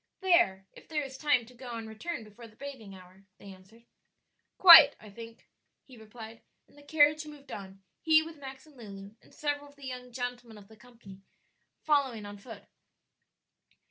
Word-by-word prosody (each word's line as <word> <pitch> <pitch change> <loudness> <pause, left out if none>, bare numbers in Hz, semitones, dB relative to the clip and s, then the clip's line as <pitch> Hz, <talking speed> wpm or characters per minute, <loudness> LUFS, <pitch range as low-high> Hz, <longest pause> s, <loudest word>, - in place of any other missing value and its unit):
"There, 345 - +2
if - - -17
there 305 -2 -2
is 270 -1 -9
time 275 -4 +1
to 250 - -17
go 245 -1 -9
and 225 -1 -7
return 225 +6 -6
before 215 +2 -14
the 215 - -21
bathing 235 -7 -10
hour," 185 +1 -17
they 200 -1 -12
answered. 195 +5 -20 0.7
"Quite. 330 -6 +10
I 215 - -14
think," 230 +2 -13 0.4
he 260 - -17
replied, 220 0 -12 0.3
and - - -25
the 290 - -17
carriage 300 +1 +2
moved 290 -2 -13
on, 195 -1 -10 0.2
he 315 -1 +4
with 320 0 -11
Max 265 0 -10
and 305 -2 -20
Lulu, 200 -3 -11
and - - -23
several 290 -1 -4
of 285 - -21
the 280 -1 -13
young 250 -1 -8
gentlemen 245 -2 -6
of 200 -1 -16
the 220 - -16
company 215 -4 -16 0.6
following 270 -8 0
on 205 0 -10
foot. 220 -1 -12
245 Hz, 180 wpm, -29 LUFS, 215-285 Hz, 0.7 s, Quite